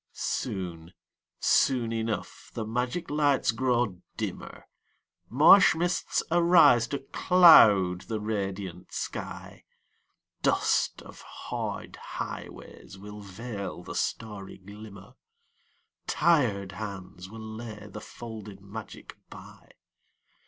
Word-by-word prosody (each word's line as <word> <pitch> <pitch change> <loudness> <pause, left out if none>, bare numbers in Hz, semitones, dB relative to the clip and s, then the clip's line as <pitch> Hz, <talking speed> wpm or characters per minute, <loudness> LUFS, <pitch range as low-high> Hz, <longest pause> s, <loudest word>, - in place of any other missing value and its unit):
Soon, 85 -2 -4 0.5
soon 120 -4 +2
enough 110 -3 -4
the 110 - -3
magic 125 +9 -3
lights 145 -4 +2
grow 120 -5 0 0.2
dimmer, - - -6 0.6
Marsh 155 - +7
mists 175 +1 -1
arise 165 -8 +5
to 140 - -3
cloud 115 - +6
the 110 -2 -3
radiant 95 -4 -4
sky, - - -6 0.8
Dust - - +1
of - - -13
hard - - -6
highways - - -8
will 105 +1 -10
veil 100 -2 -7
the 95 - -8
starry 105 -4 -4
glimmer, 100 +2 -12 0.9
Tired 115 - +2
hands 95 -2 -8
will 110 +2 -10
lay 110 -1 -8
the 105 +1 -9
folded 105 -4 -10
magic 100 +2 -10
by. - - -14
110 Hz, 95 wpm, -27 LUFS, 100-125 Hz, 0.9 s, Marsh